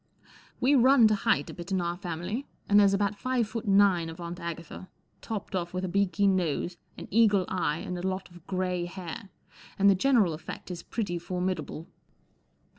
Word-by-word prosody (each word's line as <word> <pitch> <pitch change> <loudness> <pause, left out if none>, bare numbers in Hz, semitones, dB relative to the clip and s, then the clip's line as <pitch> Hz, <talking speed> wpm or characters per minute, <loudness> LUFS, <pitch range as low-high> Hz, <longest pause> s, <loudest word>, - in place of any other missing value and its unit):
We 265 +3 +3
run 260 -2 +6
to - - +3
height 170 -8 +1
a - - -10
bit 175 +2 -8
in 190 - +2
our 175 0 -1
family, 180 - -4 0.2
and 205 0 +6
there's 200 -1 +5
about 200 0 -1
five 255 -3 0
foot 225 +1 -5
nine 195 -4 +4
of 165 - -9
Aunt 170 +1 -6
Agatha, 170 +2 -7 0.3
topped 215 -3 -5
off 175 -1 -3
with 185 +1 -1
a - - -2
beaky 200 +2 +1
nose, 180 -3 +1 0.2
an - - -8
eagle 210 -4 +4
eye, 165 -5 -1
and 180 - -5
a 180 - -2
lot 190 0 -3
of 175 -1 -16
grey 185 -2 -1
hair, 185 +4 -7 0.5
and 200 0 +6
the - - +6
general 210 -4 +3
effect 160 +3 -8
is 175 -1 -6
pretty 175 -6 -3
formidable. 180 -3 -3
185 Hz, 190 wpm, -28 LUFS, 175-205 Hz, 0.5 s, run